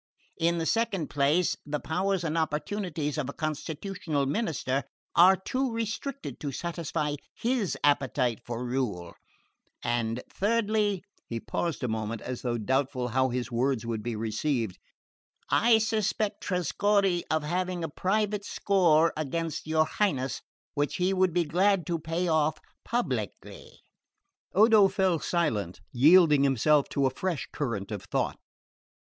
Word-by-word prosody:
In 170 +1 +2
the 165 - -1
second 210 -6 0
place, 145 +5 +2
the 150 0 -3
powers 185 +4 -1
and 165 -1 -1
opportunities 155 -1 -2
of 140 -2 -2
a - - -5
constitutional 155 0 -3
minister 140 - -1 0.3
are 185 +3 +8
too 255 +7 -2
restricted 230 +5 -4
to 145 - -3
satisfy 160 -1 -3 0.2
his 235 -5 -1
appetite 135 -4 +2
for 120 +1 -4
rule; 120 -9 -2 0.7
and 120 0 -1
thirdly 210 -2 0
" - - -38
he 115 - -3
paused 160 +3 -3
a - - +1
moment, 110 0 -3
as 125 -1 -5
though 120 -2 -1
doubtful 130 +2 0
how 130 +2 +2
his 125 0 -3
words 120 0 0
would 115 -2 -2
be 120 +1 -3
received 110 -1 -2 0.7
"I 230 0 +5
suspect 215 -1 0
Trescorre 185 +2 +1
of 155 -1 +1
having 180 +2 -2
a - - -1
private 205 +6 0
score 170 -6 +3
against 155 +1 -3
your 155 0 +3
Highness, 140 -10 -1 0.3
which 145 -1 -1
he 180 +2 +1
would 185 -1 +3
be 175 +1 +2
glad 185 +4 +2
to 170 -2 -1
pay 165 +3 -2
off 155 -1 +2 0.3
publicly." 130 - -3 0.9
Odo 215 0 +7
fell 190 -3 +1
silent, 115 - -1
yielding 150 +2 +6
himself 140 +2 +3
to 140 - +1
a 130 - +2
fresh 175 +2 -3
current 115 -9 -3
of 105 -1 -5
thought. - - -1
155 Hz, 140 wpm, -28 LUFS, 130-190 Hz, 0.9 s, are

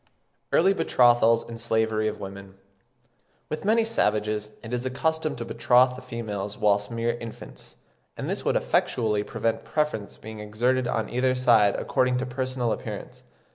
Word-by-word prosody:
EARLY 190 +4 +4
BETROTHALS 120 - +4
AND 115 -1 -8
SLAVERY 110 -1 +1
OF 110 0 -3
WOMEN. 95 0 -9 0.9
With 155 - -4
many 220 +2 +3
savages 105 - 0
it 115 +1 -7
is 125 - 0
the 130 - -2
custom 160 +4 -1
to 120 - -6
betroth 125 +2 +3
the 130 - -9
females 105 -5 -5
whilst 105 0 +2
mere 115 0 -1
infants; 115 -1 -10 0.4
and - - -4
this - - -3
would - - +1
effectually 110 -4 +1
prevent 115 +2 -2
preference 115 -3 -2
being 110 0 -9
exerted 120 +4 0
on 110 -3 -1
either 130 +1 +1
side 115 -5 +4
according 125 0 +1
to 130 - -2
personal 130 -2 -2
appearance. - - -6
115 Hz, 155 wpm, -26 LUFS, 110-130 Hz, 0.9 s, EARLY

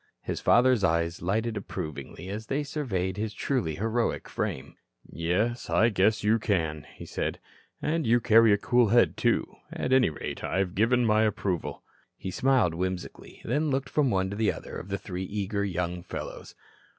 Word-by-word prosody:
His - - -3
father's 125 -3 +4
eyes 85 -1 +1
lighted 110 +5 0
approvingly 80 -5 -6
as 105 +3 -5
they 140 +2 -1
surveyed 100 - -2
his 105 0 -3
truly 120 - -1
heroic 115 +6 -1
frame. 65 - -4 0.3
"Yes, 95 +9 -1
I 115 - +4
guess 105 +1 +2
you 110 +2 +3
can," 80 -8 -1
he - - -9
said. - - -3 0.4
"And 160 -3 0
you 120 +2 +5
carry 115 -1 +6
a 100 - +5
cool 120 +3 +3
head, 120 +3 +4
too. - - +2 0.3
At 130 - -1
any 130 -6 +5
rate, 75 - -6
I've 95 -1 -1
given 120 +4 +3
my 110 -1 +4
approval." 100 -5 -1 0.3
He 95 - -5
smiled 125 -7 +2
whimsically, 90 +1 -5
then 150 +6 0
looked 135 -1 -1
from 145 -3 +2
one 95 -3 0
to 100 - -5
another 105 - -2
of - - -6
the 100 - -1
three 95 -1 -5
eager 100 +1 -2
young 90 -2 -2
fellows. - - -7
105 Hz, 170 wpm, -28 LUFS, 90-120 Hz, 0.4 s, carry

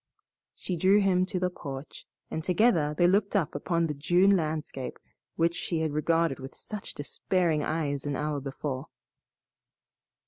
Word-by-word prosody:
She 180 - -4
drew 190 +4 +5
him 185 -2 +3
to 185 -1 -1
the 180 0 0
porch, 140 -4 -8 0.2
and 160 - -3
together 175 -5 +3
they 175 - +4
looked 200 +3 +3
upon 170 -1 +1
the 155 - -2
June 175 +7 +4
landscape 155 -5 -3 0.4
which 165 +1 +2
she 165 -1 -2
had 155 -2 -1
regarded 165 -1 +1
with 135 0 -9
such 210 -2 -7
despairing 165 +2 0
eyes 145 -3 -1
an 145 - -1
hour 150 0 -1
before. 135 -1 -4
165 Hz, 145 wpm, -28 LUFS, 145-180 Hz, 0.4 s, drew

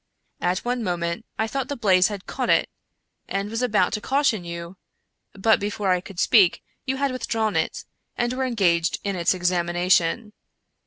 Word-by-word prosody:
At 180 +4 -1
one 245 -1 -1
moment 175 +2 -2
I 220 - +1
thought 265 +3 -3
the 285 - -3
blaze 185 -6 +4
had 205 -3 -6
caught - - -3
it, - - +3 0.6
and 200 +1 -3
was 225 +1 -2
about 210 -7 +2
to 210 - -2
caution 265 -8 +1
you, 170 +1 -7 0.6
but, 220 +3 +3
before 205 -1 -1
I 180 -1 +2
could 185 -1 -10
speak, 195 -7 +4 0.2
you 265 +1 -1
had 280 0 0
withdrawn 225 -4 -1
it, - - -1 0.3
and 240 +1 0
were 260 +1 -1
engaged 180 -9 +1
in 200 -1 -2
its 175 +1 +1
examination. 175 +3 +1
200 Hz, 170 wpm, -24 LUFS, 180-230 Hz, 0.6 s, blaze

